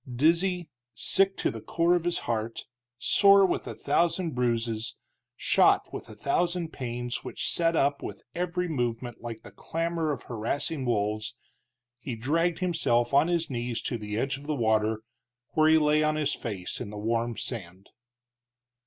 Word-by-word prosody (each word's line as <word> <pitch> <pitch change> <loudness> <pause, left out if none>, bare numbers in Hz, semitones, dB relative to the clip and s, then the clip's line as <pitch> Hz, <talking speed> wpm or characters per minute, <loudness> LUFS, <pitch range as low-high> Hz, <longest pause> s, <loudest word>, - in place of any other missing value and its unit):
Dizzy, 170 +6 +2 0.3
sick 195 - +2
to - - 0
the - - -7
core 170 +1 +2
of 175 -1 +1
his 175 - +1
heart, 115 0 -2 0.3
sore 200 - +6
with 185 - -1
a - - -5
thousand 170 0 +1
bruises, 115 -2 -1 0.4
shot - - +3
with - - -7
a - - -10
thousand 175 -1 0
pains 120 -1 -4
which - - -2
set 165 -1 +2
up 140 -1 +2
with 100 - -7
every 180 +1 -1
movement 120 -5 -2
like 115 -1 -7
the - - -11
clamor 165 -1 -2
of 140 - -4
harassing 130 +5 -2
wolves, 110 -1 -1 0.6
he 125 -1 -5
dragged 165 +9 +1
himself 140 -9 +1
on 140 +4 +5
his 170 -2 +1
knees 120 -3 -3
to 120 - -2
the 105 0 -4
edge 135 +3 0
of 145 - -12
the 155 - 0
water, 110 -2 +1 0.5
where 155 0 +4
he 160 - +7
lay 150 0 +3
on 155 0 +2
his 150 -2 0
face 100 -5 -4
in 115 - -5
the 105 - -7
warm 115 +2 -1
sand. 95 -5 -7
135 Hz, 165 wpm, -28 LUFS, 115-165 Hz, 0.6 s, he